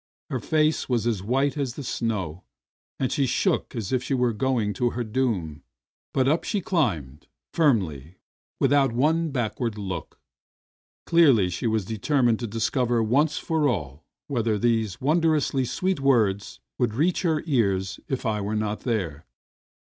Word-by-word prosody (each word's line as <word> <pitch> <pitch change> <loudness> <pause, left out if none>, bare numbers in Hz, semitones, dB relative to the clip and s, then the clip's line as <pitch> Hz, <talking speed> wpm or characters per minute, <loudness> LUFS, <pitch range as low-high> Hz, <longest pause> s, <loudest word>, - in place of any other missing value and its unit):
Her - - -1
face 155 -1 +1
was 120 -3 +1
as 115 -5 0
white 130 +6 +1
as 135 -4 -2
the 145 - -6
snow, 95 - -3 0.6
and 130 - 0
she 140 -2 +1
shook 130 +1 0
as 115 -1 -3
if 130 - +2
she 135 +2 -1
were 125 -2 +1
going 110 -2 0
to 120 +5 +1
her 120 0 -3
doom, 105 - -2 0.5
but 130 -1 +1
up 155 +4 +2
she 205 - -1
climbed, 90 - -1 0.3
firmly, 95 - +1 0.4
without 140 -4 +3
one 160 +6 +2
backward 120 -4 -2
look. 95 -5 -6 0.9
Clearly 135 - +4
she 115 +6 -1
had 110 -3 0
determined 120 +2 +1
to 120 - -3
discover 115 +2 0
once 140 +8 +2
for 160 -2 0
all 75 - -4 0.2
whether 115 -6 0
those 110 -3 0
wondrously 150 -2 +2
sweet 185 +7 -1
words 110 -8 +1 0.2
would 120 -4 +1
reach 165 +7 +1
her 160 -4 0
ears 100 - 0
if 130 -1 -3
I 105 -2 0
were 105 +2 -2
not 105 0 -1
there. 90 - -3
120 Hz, 155 wpm, -25 LUFS, 105-140 Hz, 0.9 s, Clearly